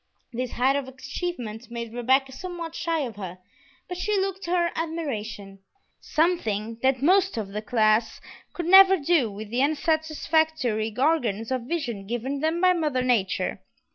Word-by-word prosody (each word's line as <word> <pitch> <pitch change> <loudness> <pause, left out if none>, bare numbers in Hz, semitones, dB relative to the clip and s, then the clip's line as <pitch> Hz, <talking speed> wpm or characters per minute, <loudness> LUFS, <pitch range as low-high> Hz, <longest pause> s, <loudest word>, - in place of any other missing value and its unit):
This 250 +1 -3
height 260 +3 +2
of 280 -2 -2
achievement 260 -4 -6
made 235 -1 -6
Rebecca 260 +3 +2
somewhat 340 +2 -6
shy 330 -1 -1
of 235 -7 -5
her, 185 -3 -6 0.5
but 360 0 -6
she 420 +1 0
looked 385 -1 -3
her 345 -1 +1
admiration; 220 -12 -4 0.4
something 230 - 0
that 265 0 +1
most 380 0 +3
of 210 -3 -3
the 210 +2 -4
class 215 0 +2 0.3
could 350 - -5
never 385 +2 +8
do 290 -6 +2
with 210 +1 -8
the 245 +2 +1
unsatisfactory 310 -5 +1
organs 250 -7 +1
of 250 -2 -2
vision 245 -12 -3
given 245 +5 -3
them 320 +3 0
by 365 0 +5
Mother 300 -7 0
Nature. 230 -7 0
265 Hz, 150 wpm, -25 LUFS, 225-330 Hz, 0.5 s, never